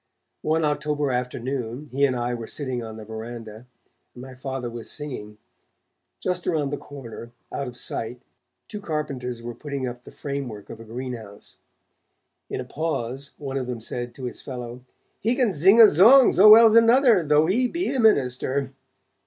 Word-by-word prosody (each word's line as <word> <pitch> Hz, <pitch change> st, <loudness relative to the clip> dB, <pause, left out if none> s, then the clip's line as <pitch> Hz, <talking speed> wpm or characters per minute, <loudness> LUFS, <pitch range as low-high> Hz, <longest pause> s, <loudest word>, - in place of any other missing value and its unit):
One 160 Hz, +1 st, +1 dB
October 150 Hz, -1 st, -1 dB
afternoon 125 Hz, +1 st, -3 dB
he 140 Hz, +2 st, +2 dB
and 130 Hz, -2 st, 0 dB
I 120 Hz, 0 st, -2 dB
were 115 Hz, -2 st, -6 dB
sitting 130 Hz, -4 st, -3 dB
on 110 Hz, -1 st, -8 dB
the 110 Hz, -, -9 dB
verandah, 110 Hz, +1 st, -8 dB, 0.5 s
and 125 Hz, -, -10 dB
my 130 Hz, 0 st, -10 dB
Father 130 Hz, -1 st, -5 dB
was 120 Hz, -1 st, -7 dB
singing; 115 Hz, -8 st, -6 dB, 0.8 s
just 180 Hz, -1 st, -2 dB
around 150 Hz, -5 st, 0 dB
the 145 Hz, -, -2 dB
corner, 120 Hz, -5 st, -10 dB, 0.2 s
out 140 Hz, -, -3 dB
of 120 Hz, -1 st, -9 dB
sight, 120 Hz, 0 st, -4 dB, 0.5 s
two 210 Hz, -2 st, -7 dB
carpenters 135 Hz, -, -4 dB
were 120 Hz, 0 st, -5 dB
putting 140 Hz, -1 st, -5 dB
up 120 Hz, 0 st, -7 dB
the -, -, -14 dB
framework 135 Hz, -8 st, -6 dB
of 115 Hz, -, -9 dB
a -, -, -9 dB
greenhouse. 115 Hz, -3 st, -8 dB, 0.9 s
In -, -, -4 dB
a -, -, -5 dB
pause, 140 Hz, -4 st, -4 dB
one 135 Hz, -2 st, -4 dB
of 130 Hz, -2 st, -3 dB
them 125 Hz, -2 st, -4 dB
said 120 Hz, +2 st, -5 dB
to 135 Hz, -, -10 dB
his 125 Hz, -, -5 dB
fellow: 125 Hz, -2 st, -7 dB, 0.4 s
'He 230 Hz, +4 st, +1 dB
can 250 Hz, -5 st, +2 dB
zing 190 Hz, +9 st, +5 dB
a -, -, +12 dB
zong, 225 Hz, -, +7 dB
zo 200 Hz, +4 st, +7 dB
well's 225 Hz, 0 st, +9 dB
another, 230 Hz, -2 st, +6 dB
though 150 Hz, 0 st, +3 dB
he 235 Hz, +9 st, +2 dB
be 340 Hz, +8 st, -2 dB
a 265 Hz, -, -1 dB
minister.' 135 Hz, -, +1 dB
135 Hz, 175 wpm, -24 LUFS, 120-155 Hz, 0.9 s, a